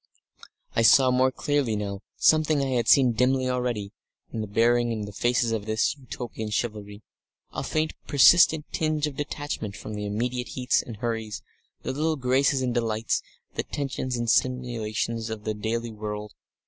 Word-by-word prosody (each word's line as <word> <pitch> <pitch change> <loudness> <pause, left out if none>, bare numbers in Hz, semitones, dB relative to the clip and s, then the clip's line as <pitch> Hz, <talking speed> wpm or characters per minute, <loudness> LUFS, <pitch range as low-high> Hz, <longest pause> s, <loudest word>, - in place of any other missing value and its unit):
I - - +3
saw 125 +4 +6
more 130 +1 +3
clearly 140 -4 0
now 100 -1 -4 0.2
something 155 -1 +4
I 135 - -1
had 120 -3 0
seen 130 -3 +6
dimly 130 +2 +2
already, 125 -5 -2 0.4
in 110 - -2
the 110 - -4
bearing 120 +3 +2
and 110 -2 -3
the - - -7
faces 120 +2 +1
of 110 -2 -3
this 110 +5 +1
Utopian 120 -5 -6
chivalry, 105 -2 -4 0.5
a - - -3
faint 155 0 -1
persistent 155 +2 +6
tinge 155 -1 0
of 150 -2 -5
detachment 145 -7 -4
from 110 - -8
the 105 0 -4
immediate 125 +4 -2
heats 125 -1 +1
and 115 -3 -9
hurries, 110 -1 -3 0.4
the - - -2
little 155 +3 0
graces 130 0 +2
and 125 -1 0
delights, 115 -2 0 0.3
the - - -1
tensions 130 -3 -3
and 120 0 -2
stimulations 115 -2 0
of 110 -1 -6
the 110 - -2
daily 115 +2 -3
world. 105 -1 -6
120 Hz, 165 wpm, -26 LUFS, 110-130 Hz, 0.5 s, saw